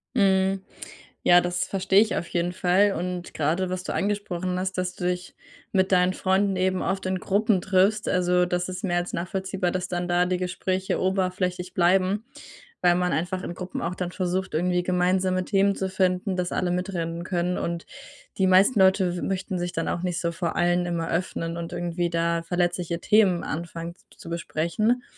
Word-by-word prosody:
Mhm. 195 -2 +3 0.6
Ja, 175 0 +7
das 175 0 -1
verstehe 195 0 +3
ich 220 - +1
auf 170 - -3
jeden 175 +1 -1
Fall. 190 +3 +3
Und 180 0 -4
grade, 165 +5 0
was 185 0 -3
du - - -4
angesprochen 185 -3 -2
hast, 190 0 -3
dass 180 0 -2
du 180 - -5
dich 180 0 -2 0.4
mit 190 0 +2
deinen 180 0 +4
Freunden 190 +1 +1
eben 185 0 +1
oft 190 0 -2
in 185 0 -1
Gruppen 200 0 +1
triffst. 195 +3 +2
Also, 180 0 +2
das 180 0 -1
ist 185 0 -6
mehr 175 -3 0
als 175 0 -2
nachvollziehbar, 185 0 -2
dass 185 0 -3
dann 175 0 -2
da 175 0 +3
die 180 0 0
Gespräche 185 +1 -2
oberflächlich 185 -1 -1
bleiben, 185 +4 +2 0.6
weil 175 0 +4
man 180 0 +1
einfach 180 +3 -2
in 175 - -5
Gruppen 185 0 -5
auch 175 +2 -2
dann 180 -1 -3
versucht, 185 0 -2
irgendwie 180 +2 +1
gemeinsame 185 +1 +1
Themen 200 0 +2
zu 190 - -2
finden, 185 0 0
dass 180 -1 -1
alle 180 -1 0
mitreden 175 -2 -3
können. 180 0 -1
Und 170 0 -3 0.5
die 190 - +3
meisten 195 +5 +5
Leute 190 -2 +3
möchten 185 -1 -2
sich 175 0 -3
dann 165 - -2
auch 175 - -2
nicht 180 -2 -1
so 170 -1 0
vor 170 -1 -3
allen 175 0 +2
immer 170 -2 -2
öffnen 165 -1 -2
und 170 0 -5
irgendwie 175 0 -1
da 170 0 0
verletzliche 175 -1 -1
Themen 200 -5 +3
anfangen 170 +1 -5
z - - -28
zu - - -10
besprechen. 170 +8 0
180 Hz, 185 wpm, -25 LUFS, 175-190 Hz, 0.6 s, Ja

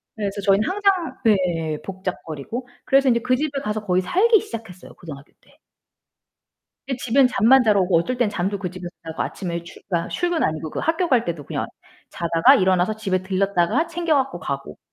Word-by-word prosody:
그래서 200 -2 -3
저희는 200 +2 +3
항상 390 -3 +1
네 170 -7 +1
복작거리고. 190 - -6 0.2
그래서 270 0 +3
인제 235 -1 +2
그 255 +1 +2
집에 285 +1 -2
가서 210 -1 -3
거의 185 -1 +2
살기 425 - +4
시작했어요 220 -6 -9
고등학교 145 -4 -11
때. - - -26 1.3
그때 270 - -2
집엔 255 +2 +3
잠만 250 +3 +5
자러 210 -3 +3
오고 180 -2 +3
어떨 250 +9 -2
땐 240 -4 +2
잠도 195 +1 -2
그 185 -2 -3
집에서 180 0 -8
자고 160 -1 -5
아침에 170 -3 -5
출 170 - -13
아 170 -2 0
출근 350 -2 -1
아니고 155 0 -2
그 - - -5
학교 330 +2 0
갈 250 -7 +3
때도 160 -4 -4
그냥 - - -3 0.4
자다가 165 -1 +4
일어나서 185 +2 +2
집에 190 -4 -1
들렀다가 195 - +1
챙겨 335 -1 0
갖고 270 -1 -1
가고. - - -5
200 Hz, 385 characters per minute, -22 LUFS, 175-265 Hz, 1.3 s, 잠만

